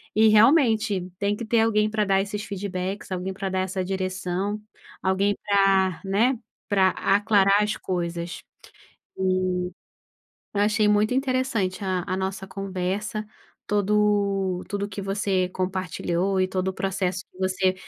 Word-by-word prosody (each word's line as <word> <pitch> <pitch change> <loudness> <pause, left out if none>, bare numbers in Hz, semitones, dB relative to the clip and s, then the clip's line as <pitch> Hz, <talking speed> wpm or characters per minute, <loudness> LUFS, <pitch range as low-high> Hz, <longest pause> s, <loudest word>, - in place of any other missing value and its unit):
e 220 +1 +6
realmente 215 - +4
tem 200 +1 0
que 235 - -6
ter 225 0 +3
alguém 215 -1 +2
pra 215 -1 0
dar 195 0 +3
esses 210 +1 -4
feedbacks, 195 0 -4
alguém 185 +1 -3
pra 195 0 -4
dar 185 0 0
essa 185 0 -2
direção, 190 +2 -2 0.4
alguém 195 +2 +1
pra, 195 -2 +3
né, 225 +6 +2 0.3
pra 195 -2 +4
aclarar 200 0 +3
as 210 - -1
coisas. 170 -1 -3 0.8
E 185 -1 0 0.9
eu 200 - +1
achei 210 0 +3
muito 210 +3 +3
interessante 255 -8 0
a 185 -2 0
a 185 -1 -1
nossa 190 0 -3
conversa, 195 +2 -3 0.4
tudo 200 -2 +1
tudo 200 0 -2
que 200 0 -6
você 195 -2 0
compartilhou 185 0 -1
e 185 - +2
todo 185 0 -1
o - - -1
processo 190 -1 -2
que 185 - -21
você 185 0 +1
195 Hz, 140 wpm, -25 LUFS, 185-210 Hz, 0.9 s, e